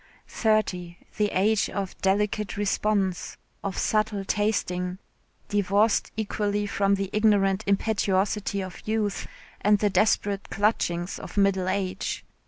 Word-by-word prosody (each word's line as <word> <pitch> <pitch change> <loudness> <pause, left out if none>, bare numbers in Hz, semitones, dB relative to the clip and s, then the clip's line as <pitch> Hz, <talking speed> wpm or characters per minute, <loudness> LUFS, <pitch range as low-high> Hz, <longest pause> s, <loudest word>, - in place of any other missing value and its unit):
Thirty, 185 -6 0 0.2
the 210 - +3
age 205 +3 +2
of 195 -2 -4
delicate 205 +2 0
response, 205 -2 0 0.3
of 195 -2 -3
subtle 215 -2 0
tasting, 180 -4 -1 0.5
divorced 205 +1 +2
equally 205 -1 -1
from 200 -1 +2
the 195 -1 -3
ignorant 205 -2 +3
impetuosity 200 0 +1
of 185 -1 -8
youth 215 -2 -1 0.3
and 210 0 +4
the 205 0 +1
desperate 200 -1 +1
clutchings 185 -4 0
of - - -10
middle 195 -2 +2
age. 190 -1 -2
200 Hz, 115 wpm, -26 LUFS, 190-210 Hz, 0.5 s, and